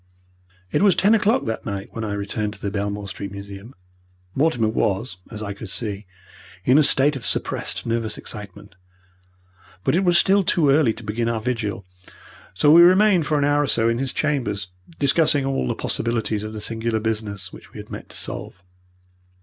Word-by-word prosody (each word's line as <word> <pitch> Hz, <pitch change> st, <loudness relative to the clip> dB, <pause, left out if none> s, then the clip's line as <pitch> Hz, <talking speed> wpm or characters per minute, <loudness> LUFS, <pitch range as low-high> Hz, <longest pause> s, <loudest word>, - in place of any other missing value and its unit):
It -, -, +1 dB
was 200 Hz, -2 st, +5 dB
ten 205 Hz, +3 st, +4 dB
o'clock 215 Hz, 0 st, +2 dB
that 115 Hz, 0 st, -3 dB
night 100 Hz, -1 st, -5 dB
when 115 Hz, -, -5 dB
I 105 Hz, -2 st, -3 dB
returned 105 Hz, +1 st, -3 dB
to -, -, -15 dB
the 100 Hz, -, -3 dB
Belmore 100 Hz, 0 st, -3 dB
Street 100 Hz, 0 st, -6 dB
Museum. 100 Hz, +4 st, -9 dB, 0.6 s
Mortimer 135 Hz, -6 st, +1 dB
was, 105 Hz, -2 st, -1 dB
as 110 Hz, -2 st, -6 dB
I 100 Hz, -1 st, -4 dB
could 105 Hz, 0 st, -9 dB
see, 100 Hz, -1 st, -4 dB, 0.6 s
in 130 Hz, +4 st, +5 dB
a -, -, +6 dB
state 145 Hz, 0 st, +4 dB
of 130 Hz, -, -6 dB
suppressed -, -, -2 dB
nervous 115 Hz, -1 st, -1 dB
excitement, 105 Hz, -1 st, -8 dB, 1.1 s
but -, -, +1 dB
it 185 Hz, -, +2 dB
was 175 Hz, -2 st, +4 dB
still 195 Hz, +2 st, +4 dB
too 160 Hz, -5 st, +3 dB
early 140 Hz, -4 st, +4 dB
to 115 Hz, +1 st, -9 dB
begin 115 Hz, +3 st, -2 dB
our 115 Hz, -1 st, -1 dB
vigil, 110 Hz, -4 st, -3 dB, 0.7 s
so 145 Hz, +10 st, +4 dB
we 170 Hz, +2 st, +9 dB
remained 185 Hz, -2 st, +5 dB
for 155 Hz, -, +1 dB
an 145 Hz, -, +2 dB
hour 145 Hz, 0 st, +3 dB
or 145 Hz, -, 0 dB
so 115 Hz, -2 st, +2 dB
in 115 Hz, +1 st, 0 dB
his 135 Hz, -1 st, 0 dB
chambers, 120 Hz, -11 st, -1 dB, 0.3 s
discussing 145 Hz, 0 st, +3 dB
all 135 Hz, -, -1 dB
the -, -, -1 dB
possibilities 110 Hz, -2 st, -2 dB
of 110 Hz, -, -5 dB
the 105 Hz, -, -6 dB
singular 115 Hz, 0 st, -2 dB
business 105 Hz, -4 st, -4 dB
which -, -, -13 dB
we -, -, -12 dB
had -, -, -10 dB
met -, -, -8 dB
to -, -, -9 dB
solve. 90 Hz, -, -6 dB
115 Hz, 190 wpm, -22 LUFS, 105-145 Hz, 1.1 s, we